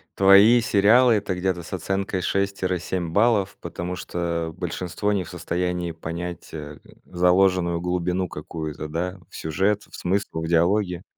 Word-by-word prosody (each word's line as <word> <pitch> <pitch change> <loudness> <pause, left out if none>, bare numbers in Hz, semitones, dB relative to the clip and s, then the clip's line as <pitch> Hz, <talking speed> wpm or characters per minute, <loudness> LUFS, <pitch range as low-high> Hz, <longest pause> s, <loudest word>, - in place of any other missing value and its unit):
твои 100 +5 +7
сериалы- 115 +4 +5
это 100 -2 -1
где-то 90 -1 -1
с 85 - -10
оценкой 95 +1 -2
6 100 +2 -1
тире 90 -1 0
7 85 0 -3
баллов, 105 0 +2
потому 90 +1 -5
что 85 -2 -3
большинство 90 +3 -2
не 100 -2 0
в 80 - -12
состоянии 90 0 -2
понять, 85 +1 -6
э, 75 -2 -8 0.3
заложенную 90 -1 +2
глубину 90 +1 -1
какую-то, 80 -1 -6
да, 90 +5 -3
в - - -14
сюжет, 95 +7 0
в - - -11
смыслах, 90 -3 -2
в - - -4
диалоги? 90 +2 +1
90 Hz, 150 wpm, -24 LUFS, 85-100 Hz, 0.3 s, твои